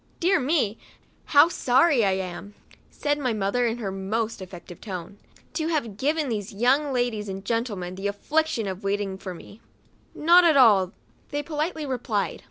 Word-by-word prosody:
" -, -, -36 dB
Dear 370 Hz, +2 st, +3 dB
me! 255 Hz, -6 st, 0 dB, 0.5 s
how 290 Hz, +2 st, +6 dB
sorry 265 Hz, -3 st, +3 dB
I 195 Hz, -2 st, +3 dB
am," 190 Hz, +2 st, -5 dB, 0.3 s
said 290 Hz, 0 st, -1 dB
my 255 Hz, -4 st, 0 dB
mother, 215 Hz, +4 st, 0 dB
in 230 Hz, +1 st, -2 dB
her 205 Hz, -5 st, -4 dB
most 215 Hz, +3 st, -3 dB
affected 175 Hz, -2 st, -10 dB
tone, 190 Hz, -1 st, -7 dB, 0.2 s
" -, -, -28 dB
to 315 Hz, -1 st, -1 dB
have 285 Hz, -11 st, -1 dB
given 295 Hz, +6 st, 0 dB
these 215 Hz, -2 st, -3 dB
young 260 Hz, +7 st, +2 dB
ladies 240 Hz, -5 st, -1 dB
and 195 Hz, +1 st, -6 dB
gentlemen 210 Hz, -6 st, -2 dB
the 195 Hz, +2 st, -3 dB
affliction 240 Hz, +4 st, 0 dB
of 190 Hz, +1 st, -5 dB
waiting 195 Hz, -1 st, -2 dB
for 185 Hz, -2 st, -6 dB
me." 205 Hz, +5 st, -14 dB, 0.3 s
" -, -, -38 dB, 0.2 s
Not 345 Hz, +3 st, +6 dB
at 325 Hz, -4 st, +5 dB
all," 205 Hz, -7 st, +5 dB, 0.4 s
they 290 Hz, 0 st, -3 dB
politely 310 Hz, +1 st, -3 dB
replied. 245 Hz, -6 st, -2 dB
230 Hz, 175 wpm, -25 LUFS, 195-290 Hz, 0.5 s, how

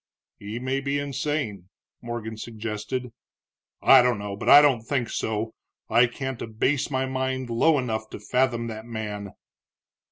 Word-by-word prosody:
"He 105 Hz, +3 st, -6 dB
may 130 Hz, +2 st, -1 dB
be 140 Hz, +1 st, -1 dB
insane," 140 Hz, -, -3 dB, 0.3 s
Morgan 120 Hz, -2 st, -5 dB
suggested. 115 Hz, +2 st, -5 dB, 0.7 s
"I 135 Hz, -1 st, +8 dB
don't 125 Hz, -2 st, +2 dB
know, 100 Hz, -1 st, -5 dB
but -, -, -3 dB
I 145 Hz, -, +11 dB
don't 140 Hz, -5 st, +4 dB
think 120 Hz, 0 st, -2 dB
so. 110 Hz, 0 st, -2 dB, 0.4 s
I 120 Hz, +2 st, +6 dB
can't 130 Hz, 0 st, -5 dB
abase 130 Hz, +6 st, 0 dB
my 130 Hz, -1 st, 0 dB
mind 130 Hz, -1 st, -2 dB
low 150 Hz, +7 st, +4 dB
enough 110 Hz, -4 st, -2 dB
to -, -, -8 dB
fathom 120 Hz, +2 st, 0 dB
that 110 Hz, 0 st, -7 dB
man." 105 Hz, -3 st, -5 dB
120 Hz, 150 wpm, -25 LUFS, 110-130 Hz, 0.7 s, I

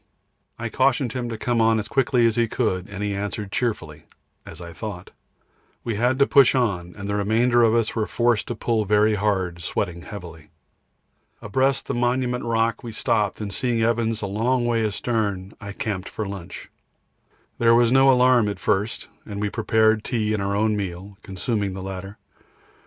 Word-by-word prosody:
I 115 Hz, -, -4 dB
cautioned 130 Hz, 0 st, +1 dB
him 125 Hz, -2 st, -3 dB
to 115 Hz, -, -4 dB
come 120 Hz, +1 st, 0 dB
on 110 Hz, 0 st, +4 dB
as 105 Hz, -1 st, -3 dB
quickly 125 Hz, -1 st, +2 dB
as 115 Hz, -1 st, +2 dB
he 120 Hz, -1 st, +2 dB
could, 105 Hz, -5 st, -1 dB
and 100 Hz, 0 st, -5 dB
he 105 Hz, -1 st, -1 dB
answered 100 Hz, 0 st, -4 dB
cheerfully 85 Hz, -12 st, -3 dB, 0.4 s
as 80 Hz, -, -9 dB
I 85 Hz, -1 st, -9 dB
thought. 95 Hz, 0 st, -7 dB, 0.7 s
We 115 Hz, -, -2 dB
had 125 Hz, +5 st, +1 dB
to 140 Hz, -, +5 dB
push 135 Hz, -2 st, +5 dB
on, 95 Hz, -9 st, -1 dB
and 100 Hz, -1 st, -6 dB
the 100 Hz, -, -2 dB
remainder 115 Hz, +4 st, +2 dB
of 115 Hz, -1 st, +4 dB
us 115 Hz, -1 st, 0 dB
were 110 Hz, -2 st, 0 dB
forced 120 Hz, -2 st, +1 dB
to 120 Hz, -, -3 dB
pull 110 Hz, 0 st, 0 dB
very 105 Hz, +2 st, +3 dB
hard, 95 Hz, -4 st, -1 dB
sweating 85 Hz, +1 st, -3 dB
heavily. 85 Hz, -6 st, -10 dB, 0.9 s
Abreast 130 Hz, +6 st, 0 dB
the -, -, -3 dB
Monument 125 Hz, +1 st, 0 dB
Rock 115 Hz, -1 st, 0 dB
we 120 Hz, -, -6 dB
stopped, 110 Hz, -3 st, 0 dB
and 100 Hz, -1 st, -4 dB
seeing 120 Hz, -1 st, 0 dB
Evans 115 Hz, -1 st, 0 dB
a -, -, 0 dB
long 120 Hz, +5 st, 0 dB
way 115 Hz, -1 st, +1 dB
astern, 105 Hz, -3 st, -2 dB
I 100 Hz, -1 st, -6 dB
camped 100 Hz, -2 st, -4 dB
for 110 Hz, -, -4 dB
lunch. 95 Hz, -3 st, -8 dB, 0.9 s
There 115 Hz, 0 st, +5 dB
was 120 Hz, 0 st, +4 dB
no 135 Hz, +1 st, +6 dB
alarm 125 Hz, -4 st, +4 dB
at 100 Hz, -, -4 dB
first, 105 Hz, +3 st, -1 dB, 0.2 s
and 100 Hz, -2 st, -7 dB
we 105 Hz, 0 st, -1 dB
prepared 110 Hz, -1 st, +2 dB
tea 110 Hz, -3 st, -1 dB
and 105 Hz, -, -1 dB
our 100 Hz, 0 st, -1 dB
own 110 Hz, +1 st, +1 dB
meal, 95 Hz, 0 st, -5 dB
consuming 100 Hz, +1 st, -3 dB
the 95 Hz, -, -6 dB
latter. 95 Hz, +1 st, -7 dB
110 Hz, 185 wpm, -23 LUFS, 100-120 Hz, 0.9 s, no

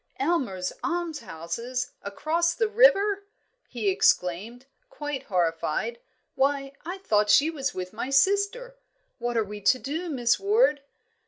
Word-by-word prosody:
"Aylmer's 260 Hz, -, -1 dB
Almshouses, 250 Hz, -, -3 dB
across 330 Hz, +12 st, 0 dB
the 450 Hz, -, +1 dB
river!" 420 Hz, -3 st, +4 dB, 0.4 s
he 230 Hz, -4 st, -3 dB
exclaimed, 195 Hz, +6 st, +1 dB, 0.2 s
quite 295 Hz, -, -5 dB
horrified. 180 Hz, +5 st, -1 dB, 0.3 s
"Why, 275 Hz, 0 st, 0 dB
I 355 Hz, +4 st, -5 dB
thought 210 Hz, -, +1 dB
she 295 Hz, +9 st, +5 dB
was 280 Hz, -3 st, -3 dB
with 185 Hz, +1 st, -5 dB
my 235 Hz, +4 st, -4 dB
sister! 405 Hz, -, +1 dB, 0.4 s
What 240 Hz, 0 st, -2 dB
are 225 Hz, -, +3 dB
we 210 Hz, 0 st, -8 dB
to 255 Hz, -, +4 dB
do, 315 Hz, +7 st, -4 dB
Miss 245 Hz, -5 st, +1 dB
Ward?" 410 Hz, -, +3 dB
275 Hz, 130 wpm, -26 LUFS, 215-350 Hz, 0.4 s, she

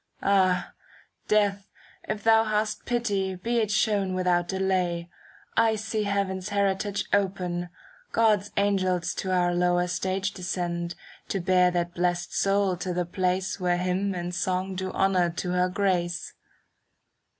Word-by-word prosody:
Ah! 185 Hz, -2 st, +2 dB, 0.5 s
Death, 205 Hz, -1 st, +1 dB, 0.4 s
if 210 Hz, -, -3 dB
thou 225 Hz, 0 st, +5 dB
hast 215 Hz, 0 st, -1 dB
pity, 205 Hz, -6 st, -1 dB
be 235 Hz, +6 st, -1 dB
it 215 Hz, -3 st, 0 dB
shown 200 Hz, -2 st, +1 dB
^* -, -, -2 dB
Without 180 Hz, -1 st, +1 dB
delay. 180 Hz, -2 st, -1 dB, 0.4 s
I 225 Hz, -1 st, +4 dB
see 215 Hz, 0 st, -2 dB
Heaven's 195 Hz, -1 st, -1 dB
heritage 200 Hz, 0 st, 0 dB
Open; 180 Hz, -3 st, 0 dB, 0.4 s
God's 210 Hz, -3 st, +3 dB
angels 185 Hz, -3 st, +1 dB
to 190 Hz, -, -3 dB
our 175 Hz, -1 st, +2 dB
lower 175 Hz, 0 st, +2 dB
stage 190 Hz, +2 st, -1 dB
Descend, 175 Hz, -2 st, -3 dB, 0.3 s
to 195 Hz, -, -1 dB
bear 180 Hz, 0 st, +4 dB
that 175 Hz, -1 st, -1 dB
blest 175 Hz, 0 st, -1 dB
soul 195 Hz, -2 st, +2 dB
to 180 Hz, 0 st, -3 dB
the 180 Hz, 0 st, 0 dB
place 185 Hz, +2 st, -1 dB
Where 180 Hz, -1 st, +1 dB
hymn 185 Hz, +2 st, -1 dB
and 175 Hz, 0 st, -4 dB
song 185 Hz, +1 st, -1 dB
do 185 Hz, 0 st, -3 dB
honour 185 Hz, -3 st, +2 dB
to 180 Hz, +1 st, -3 dB
her 180 Hz, 0 st, +2 dB
grace. 180 Hz, -3 st, -1 dB
185 Hz, 140 wpm, -26 LUFS, 180-200 Hz, 0.5 s, thou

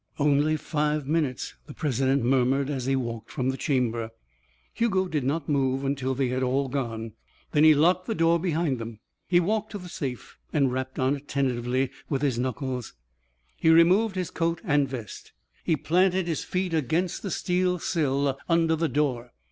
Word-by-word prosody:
"Only 150 Hz, +1 st, +2 dB
five 150 Hz, -2 st, -1 dB
minutes," 150 Hz, -4 st, -1 dB
the 145 Hz, -, -10 dB
president 135 Hz, -2 st, +1 dB
murmured 135 Hz, +2 st, +2 dB
as 130 Hz, -3 st, -3 dB
he 135 Hz, -, +2 dB
walked 115 Hz, -4 st, -4 dB
from 130 Hz, -3 st, -1 dB
the -, -, -5 dB
chamber. 120 Hz, -5 st, -1 dB, 0.6 s
Hugo 190 Hz, -5 st, +1 dB
did 150 Hz, -6 st, -1 dB
not 140 Hz, +3 st, -1 dB
move 135 Hz, -2 st, +1 dB
until 135 Hz, -1 st, -1 dB
they 130 Hz, -1 st, 0 dB
had 130 Hz, +1 st, -1 dB
all 130 Hz, +1 st, 0 dB
gone. 115 Hz, -4 st, -3 dB, 0.4 s
Then 150 Hz, -, +3 dB
he 155 Hz, -1 st, +8 dB
locked 180 Hz, +5 st, +3 dB
the 225 Hz, -, -1 dB
door 165 Hz, -1 st, +3 dB
behind 160 Hz, -6 st, 0 dB
them. 115 Hz, -1 st, -7 dB, 0.3 s
He 175 Hz, -1 st, +4 dB
walked 215 Hz, +5 st, -1 dB
to -, -, -3 dB
the 180 Hz, -2 st, -9 dB
safe 130 Hz, -7 st, -6 dB
and 140 Hz, -4 st, +2 dB
rapped 130 Hz, 0 st, -4 dB
on 130 Hz, +2 st, +2 dB
it 140 Hz, +1 st, -16 dB
tentatively 130 Hz, -1 st, 0 dB, 0.2 s
with 140 Hz, -1 st, -1 dB
his 130 Hz, -5 st, +1 dB
knuckles. 125 Hz, -, -3 dB, 0.6 s
He 160 Hz, -, +2 dB
removed 185 Hz, +6 st, +5 dB
his 185 Hz, -2 st, -3 dB
coat 165 Hz, 0 st, -1 dB
and 145 Hz, -, +2 dB
vest. 120 Hz, -6 st, -8 dB, 0.3 s
He 165 Hz, -, +2 dB
planted 180 Hz, +5 st, +2 dB
his 165 Hz, -3 st, -2 dB
feet 180 Hz, -1 st, -2 dB
against 165 Hz, +4 st, 0 dB
the 200 Hz, -, -4 dB
steel 180 Hz, 0 st, 0 dB
sill 140 Hz, -5 st, 0 dB
under 165 Hz, -1 st, +3 dB
the 160 Hz, 0 st, 0 dB
door. 125 Hz, -3 st, -1 dB
145 Hz, 180 wpm, -26 LUFS, 130-165 Hz, 0.6 s, he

